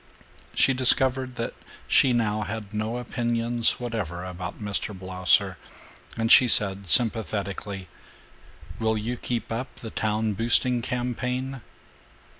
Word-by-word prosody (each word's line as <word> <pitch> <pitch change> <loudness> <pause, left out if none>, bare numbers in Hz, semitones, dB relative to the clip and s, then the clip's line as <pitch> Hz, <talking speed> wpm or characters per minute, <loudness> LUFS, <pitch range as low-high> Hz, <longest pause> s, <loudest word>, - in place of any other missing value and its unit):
She 135 - +4
discovered 130 0 +2
that 115 - -4 0.3
she 135 - +4
now 110 -3 0
had 105 0 -6
no 110 +3 -2
opinions 120 -1 0
whatever 105 -8 -4
about 90 -1 -7
Mr. 105 -1 -3
Blausser, 95 -2 +1 0.6
and 115 +1 0
she 125 - +8
said 100 -3 +4
sympathetically, 100 -4 0 0.9
"Will 110 -1 +1
you 115 +4 -3
keep 120 -1 -4
up 120 +4 -4
the 110 - -9
town 110 0 -1
boosting 120 +3 +3
campaign?" 125 +2 -3
115 Hz, 115 wpm, -25 LUFS, 105-125 Hz, 0.9 s, she